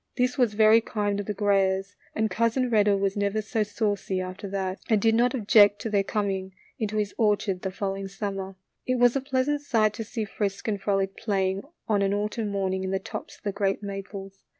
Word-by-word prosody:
This 250 0 +1
was 245 -6 +2
very 220 +1 +6
kind 205 -3 -1
of 205 - -4
the 210 - -1
Grayers, 195 -1 +1 0.2
and 220 0 0
Cousin 230 +2 +1
Redder 205 -2 +4
was 195 0 0
never 200 +1 0
so 215 +1 -1
saucy 205 -2 -1
after 185 +2 -5
that, 190 -1 -3
and 220 -2 +4
did 225 +2 +3
not 245 +3 +3
object 205 -3 +5
to 225 - -3
their 200 -1 +3
coming 195 -2 -2 0.2
into 215 -1 -2
his 205 -1 -1
orchard 205 -4 +1
the 190 - -2
following 195 0 -3
summer. 195 -1 -5 0.3
It 255 - +2
was 245 0 +4
a 275 - +1
pleasant 270 +2 0
sight 220 -7 +2
to 225 - -5
see 220 0 -4
Frisk 200 0 -3
and 205 -3 -1
Frolic 195 -1 0
playing 195 -3 0 0.3
on 205 -2 +2
an 200 0 +2
autumn 210 +2 -2
morning 190 -1 -1
in 190 - -2
the 195 - +1
tops 190 - -7
of - - -30
the 205 - -1
great 200 0 -1
maples. 195 -1 -7
205 Hz, 210 wpm, -26 LUFS, 195-220 Hz, 0.3 s, very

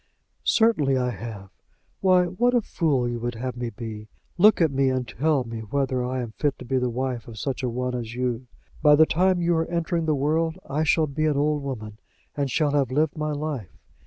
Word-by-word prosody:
"Certainly 155 - +3
I 125 -1 0
have. 105 -2 -8 0.5
Why, 185 -2 +4
what 240 +8 +1
a 240 - +4
fool 140 -11 0
you 120 0 -3
would 120 0 -3
have 125 +2 -4
me 120 -1 -3
be! 110 -1 -7 0.3
Look 210 +5 +6
at 165 -4 +3
me, 135 0 +2
and 130 -2 -1
tell 145 0 +1
me 115 -1 -6
whether 130 +3 -1
I 125 0 -2
am 115 - -7
fit 145 +4 -1
to 125 - -10
be 130 +1 0
the 125 0 0
wife 125 -1 -3
of 115 -2 -10
such 135 +3 -3
a 125 - -1
one 125 +1 -2
as 120 -2 -4
you. 125 0 -2 0.3
By 150 -1 +7
the 160 +2 +6
time 180 +2 +2
you 170 0 +2
are 160 - 0
entering 170 -1 -1
the 155 - +2
world, 160 +4 0
I 150 +3 -1
shall 160 0 +3
be 155 +2 -2
an 150 -2 +1
old 150 +1 +1
woman, 110 -6 -6 0.4
and 140 -2 -1
shall 145 +3 +1
have 140 -4 +1
lived 150 +3 +1
my 155 -1 -2
life. 145 - -4
135 Hz, 220 wpm, -25 LUFS, 120-155 Hz, 0.5 s, By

